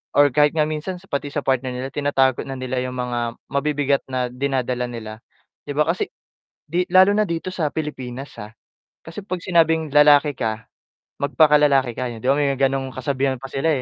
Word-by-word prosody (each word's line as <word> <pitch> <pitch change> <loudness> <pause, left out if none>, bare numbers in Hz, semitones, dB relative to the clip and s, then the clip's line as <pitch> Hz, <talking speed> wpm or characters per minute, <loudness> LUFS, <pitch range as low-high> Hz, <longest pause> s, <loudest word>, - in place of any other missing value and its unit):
or 145 -1 +5
kahit 150 +4 +3
nga 155 - +3
minsan 155 +4 -3 0.2
pati 140 0 -2
sa 145 0 -4
partner 130 -1 0
nila 130 +2 -5
tinatago 135 -2 +1
na 135 - -5
nila 130 0 -3
'yong 125 0 -4
mga 125 -1 -2 0.3
mabibigat 140 0 0
na 125 -2 -2
dinadala 125 -2 -1
nila 110 -2 -8 0.5
'di 145 - -4
ba 150 - +5
kasi 170 +3 -1 0.6
'di 175 +4 0
lalo 190 +2 +6
na 215 - +3
dito 170 -1 -4
sa 155 -5 -1
Pilipinas 135 -4 -6
ah, 105 - -9 0.6
kasi 165 +6 -8
pag 190 -2 -4
sinabing 160 -3 +2
lalaki 150 0 +6
ka 110 -3 -3 0.6
magpaka 145 +2 +4
lalaki 135 -4 +3
ka, 125 +1 -3
'di 115 0 -10
ba 135 - +5
may 140 -1 +1
gano'ng 135 -1 0
kasabihan 135 +1 -1
pa 135 - -8
sila 135 +4 0
140 Hz, 180 wpm, -21 LUFS, 130-150 Hz, 0.6 s, lalo